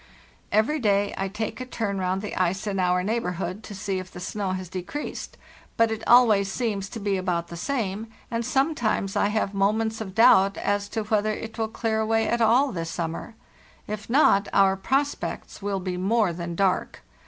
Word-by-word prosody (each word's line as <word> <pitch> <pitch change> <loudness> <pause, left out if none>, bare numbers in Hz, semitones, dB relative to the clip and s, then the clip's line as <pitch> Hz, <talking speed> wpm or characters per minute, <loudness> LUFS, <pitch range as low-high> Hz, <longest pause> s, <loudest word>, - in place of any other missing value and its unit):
* - - -32
"Every 220 +9 +2
day 205 -3 +2
I 195 - -2
take 210 +5 -4
a - - -4
turn 205 -6 -2
round 185 +1 -1
the 210 - -5
ice 185 +2 0
in 200 -2 -2
our 180 0 +2
neigh 225 +5 0
borhood 185 +1 -4
to 210 -2 -9
see 190 0 -2
if 185 0 -8
the 180 - -10
snow 190 +1 -3
has 185 -1 -4
decreased, 185 - -6 0.4
but 230 -1 +4
it 220 - -3
always 215 -5 +6
seems 205 -4 -2
to 225 - -7
be 200 -2 0
about 175 -2 -1
the 170 - -7
same, 215 +1 -2 0.2
and 230 0 -1
sometimas 250 -6 0
I - - +3
have 210 -1 -1
mo 195 +1 +3
ments 220 0 -2
of 190 -3 -6
doubt 200 -4 +6
as 205 0 -1
to 220 - -2
whether 215 0 +1
it 225 +2 -7
will 220 - +1
clear 220 0 -1
away 225 0 +1
at 235 0 0
all 245 +5 +4
this 165 -3 -4
summer. 165 +6 -4 0.5
If 210 0 -6
not, 230 -7 +4
our 195 -1 +5
prospects 270 +8 -2
will 200 -1 -1
be 180 -1 -3
more 200 0 +2
than 170 0 -5
dark. 190 0 0
205 Hz, 200 wpm, -25 LUFS, 190-225 Hz, 0.5 s, always